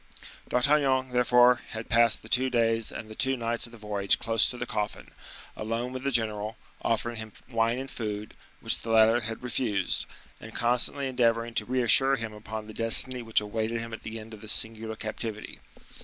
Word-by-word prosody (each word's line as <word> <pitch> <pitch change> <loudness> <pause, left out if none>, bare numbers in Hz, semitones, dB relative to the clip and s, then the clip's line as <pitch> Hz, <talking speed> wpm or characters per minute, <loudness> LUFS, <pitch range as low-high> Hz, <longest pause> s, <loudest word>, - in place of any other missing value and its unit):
D'Artagnan, 130 0 +2
therefore, 125 0 +4
had 110 0 -5
passed 115 -1 +3
the - - -11
two 130 +3 +2
days 115 -2 +1
and 110 - -7
the 110 - -9
two 135 +3 0
nights 115 0 -1
of - - -17
the 120 - -12
voyage 105 -2 0
close 115 -1 +2
to 125 - -5
the 120 - -3
coffin, 105 -3 -4 0.4
alone 115 +3 -3
with 130 - -5
the 140 - -1
general, 110 -3 0 0.2
offering 115 +1 -1
him 110 -1 -7
wine 115 -1 +1
and 135 +1 -5
food, 105 -5 -5 0.3
which - - +1
the 115 - -7
latter 115 +1 +5
had 115 +1 -5
refused, 110 -6 0 0.3
and 110 0 -11
constantly 125 +4 +1
endeavoring 115 -2 +1
to - - -1
reassure 130 +2 +5
him 115 -3 -5
upon 110 0 -7
the 110 - -10
destiny 120 +3 +2
which 115 -2 +1
awaited 110 +2 -2
him 115 0 -7
at 115 - -7
the 110 0 -7
end 110 +1 -11
of 105 - -11
this 110 - +2
singular 110 0 0
captivity. 110 0 -5
115 Hz, 190 wpm, -28 LUFS, 110-125 Hz, 0.4 s, latter